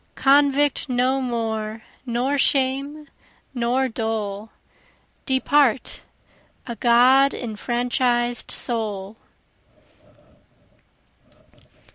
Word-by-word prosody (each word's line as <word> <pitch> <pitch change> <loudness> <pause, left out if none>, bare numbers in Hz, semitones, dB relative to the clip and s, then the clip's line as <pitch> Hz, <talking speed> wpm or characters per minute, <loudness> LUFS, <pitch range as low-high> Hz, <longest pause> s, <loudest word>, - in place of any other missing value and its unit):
Convict 285 +1 +2
no 255 +2 +1
more, 220 -3 -3 0.2
nor 250 +4 -1
shame, 275 +3 0 0.5
nor 250 +2 0
dole! 220 -3 -4 0.8
Depart 265 -2 +1 0.6
a 235 - -6
God 255 +4 +4
enfranchis'd 240 +1 -1
soul! 210 -4 -3
245 Hz, 60 wpm, -22 LUFS, 225-270 Hz, 0.8 s, God